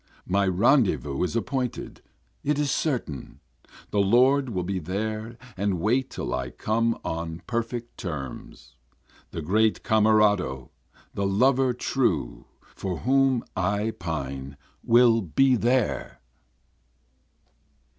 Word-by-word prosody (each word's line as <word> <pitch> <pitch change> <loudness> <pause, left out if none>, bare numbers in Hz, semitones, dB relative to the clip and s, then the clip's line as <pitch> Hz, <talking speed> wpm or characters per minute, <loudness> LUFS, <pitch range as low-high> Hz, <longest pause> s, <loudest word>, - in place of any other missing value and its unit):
My 100 +1 +1
rendezvous 95 - +2
is 90 - -1
appointed, 125 +1 -3 0.4
it 150 0 +1
is 145 -1 0
certain, 125 - -3 0.5
The 105 - +1
Lord 125 +7 +4
will 95 -5 -2
be 95 +1 -2
there 110 +6 -4 0.2
and 95 -2 -1
wait 125 +8 +1
till - - -4
I 65 0 -2
come 115 - 0
on 80 +1 -4
perfect 120 0 -4
terms, 70 -6 -7 0.5
The 80 - -6
great 110 +6 +2
Camerado, 105 - +2 0.4
the 100 -1 -1
lover 130 +6 +3
true 100 - -1 0.3
for 90 -4 -4
whom 135 -1 +3
I 100 +4 0
pine 70 -4 -5 0.3
will 115 -1 +5
be 130 - +3
there. 125 +3 0
105 Hz, 110 wpm, -26 LUFS, 90-125 Hz, 0.5 s, will